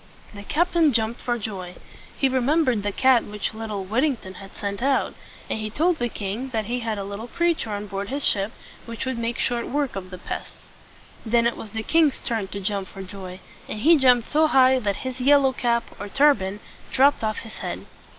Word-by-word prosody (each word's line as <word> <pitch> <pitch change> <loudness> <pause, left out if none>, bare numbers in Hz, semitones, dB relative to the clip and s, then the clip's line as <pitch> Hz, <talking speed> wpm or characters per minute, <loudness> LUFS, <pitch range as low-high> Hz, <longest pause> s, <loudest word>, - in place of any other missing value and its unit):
The 200 - -8
captain 325 - +2
jumped 225 +1 0
for 240 -1 -1
joy. 190 -5 -6 0.4
He 270 - +3
remembered 260 -2 +2
the 205 0 -1
cat 260 +3 +4
which 210 +1 -4
little 215 -3 -4
Whittington 230 -2 0
had 195 +1 -12
sent 200 +1 -4
out; 270 +1 +1 0.3
and - - -2
he 215 0 -3
told 325 +9 +1
the 240 0 0
king 215 +6 -4
that 220 -4 -2
he 245 +3 -2
had 225 -2 -2
a 200 - -3
little 200 +4 -6
creature 340 -3 0
on 205 0 -3
board 200 0 -5
his 280 +2 -1
ship 200 +1 +2 0.4
which 230 +1 -5
would 260 -2 -2
make 235 0 -2
short 240 -1 -1
work 285 -1 -1
of 185 -1 -6
the 185 - -8
pests. - - -7 0.6
Then 235 +1 +2
it 235 - +2
was 220 - -8
the 220 +2 -4
king's 315 +1 +3
turn 225 -4 -2
to 200 - -6
jump 195 0 -2
for 195 0 -9
joy; 185 -1 -8 0.3
and 210 - -4
he 330 +7 +7
jumped 250 -5 +4
so 310 +1 +3
high, 260 -2 +5
that 205 -4 -1
his 260 0 -4
yellow 275 0 +5
cap, 235 -2 +1 0.2
or 205 - -6
turban, 210 -8 +3 0.3
dropped 275 -1 +4
off 215 -1 0
his 220 - -9
head. - - -5
230 Hz, 210 wpm, -24 LUFS, 205-265 Hz, 0.6 s, he